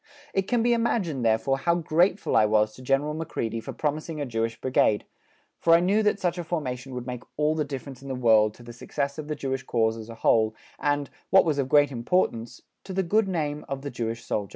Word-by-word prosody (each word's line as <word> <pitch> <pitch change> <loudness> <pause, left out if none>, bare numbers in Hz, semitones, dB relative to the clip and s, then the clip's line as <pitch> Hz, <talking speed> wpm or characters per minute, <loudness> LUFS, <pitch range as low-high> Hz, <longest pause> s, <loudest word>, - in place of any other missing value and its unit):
It 195 0 0
can 240 -2 +1
be 240 0 +3
imagined, 205 - 0
therefore, 115 +4 +2
how 170 +4 +2
grateful 175 +4 +1
I 110 - +5
was 105 0 +2
to 130 - -13
General 135 +3 +1
Macready 115 -8 -3
for - - -7
promising 155 +1 -3
a 145 - -1
Jewish 115 -1 -2
Brigade, 120 -5 +2 0.5
for 165 - +4
I - - +5
knew 195 +5 +2
that 210 -1 +1
such 175 -1 -1
a - - -2
formation 135 -6 -4
would 125 -1 -5
make 125 -1 -5 0.2
all 150 +1 +2
the 155 -1 0
difference 135 -2 -7
in 135 - -10
the 135 - -3
world 110 -4 +4
to 120 - -15
the 120 0 -10
success 140 +4 -3
of 150 - -6
the 150 - -2
Jewish 135 -2 -3
cause 115 -3 0
as 110 0 -9
a 115 - -8
whole 110 -1 +2 0.2
and, 145 0 0 0.2
what 190 - +6
was 150 -3 0
of 135 -1 -1
great 145 0 +5
importance, 120 -2 -1 0.2
to 190 - -7
the 190 +1 +1
good 210 +4 +2
name 150 -5 -2
of 135 0 -4
the 140 - -4
Jewish 115 -1 -4
soldier. 100 -3 -2
140 Hz, 230 wpm, -26 LUFS, 115-165 Hz, 0.5 s, what